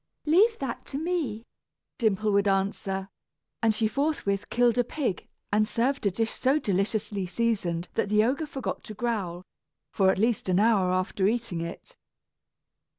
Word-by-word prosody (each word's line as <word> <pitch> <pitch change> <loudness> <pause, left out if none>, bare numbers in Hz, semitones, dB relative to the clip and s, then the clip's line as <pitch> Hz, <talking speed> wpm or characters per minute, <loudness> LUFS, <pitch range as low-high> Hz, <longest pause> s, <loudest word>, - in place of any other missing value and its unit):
"Leave 405 +9 +4
that 265 -4 -4
to 275 - -6
me," 300 -9 -2 0.5
Dimple 215 -2 +2
would 200 0 +3
answer; 195 0 -1 0.5
and 225 -2 +3
she 220 0 +2
forthwith 255 -6 -1
killed 245 0 +3
a - - +5
pig, 245 - -3 0.3
and 215 +1 +3
served 250 0 0
a - - +4
dish 225 +4 -1
so 270 +3 +2
deliciously 200 -3 -1
seasoned 180 -5 -1
that 200 - 0
the 210 +1 +4
ogre 275 +7 0
forgot 270 -2 -4
to 215 - -8
growl, 195 -6 -2 0.5
for 190 -2 +4
at - - +2
least 220 -1 +1
an 180 +1 +3
hour 205 -4 +3
after 185 +1 +1
eating 225 -6 -1
it. 170 - -7
215 Hz, 155 wpm, -27 LUFS, 195-245 Hz, 0.5 s, a